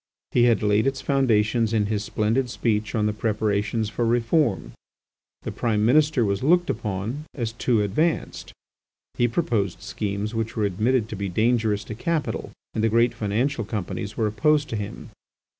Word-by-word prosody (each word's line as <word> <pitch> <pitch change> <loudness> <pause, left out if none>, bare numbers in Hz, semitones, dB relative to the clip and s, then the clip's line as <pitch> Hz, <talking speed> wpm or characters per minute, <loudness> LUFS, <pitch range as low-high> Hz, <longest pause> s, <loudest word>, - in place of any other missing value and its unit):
He 120 - +4
had 115 -2 +3
laid 105 +3 +3
its 135 0 -1
foundations 115 -4 +2
in 105 -2 +2
his 105 0 -1
splendid 115 +5 0
speech 110 -1 -1
on 105 -2 +1
the 105 - +1
preparations 105 0 0
for 120 - -2
reform. 115 - +1 0.7
The - - -4
Prime 110 -3 0
Minister 145 0 +4
was 100 -1 -1
looked 175 +5 +3
upon 110 +6 -4
as 115 -4 -2
too 120 -2 +1
advanced. 155 - -1 0.6
He 120 - +2
proposed 115 - -1
schemes 105 +1 -3
which 115 0 -3
were 110 - +1
admitted 110 +4 +1
to 110 - -5
be 100 0 -3
dangerous 110 +1 +1
to 110 - -7
capital, 155 +6 -2 0.2
and 110 - -1
the 115 - +3
great 115 +2 +3
financial 115 +5 -1
companies 105 0 -5
were 110 - +1
opposed 145 +8 +2
to - - -3
him. 110 +2 -6
110 Hz, 165 wpm, -24 LUFS, 105-120 Hz, 0.7 s, He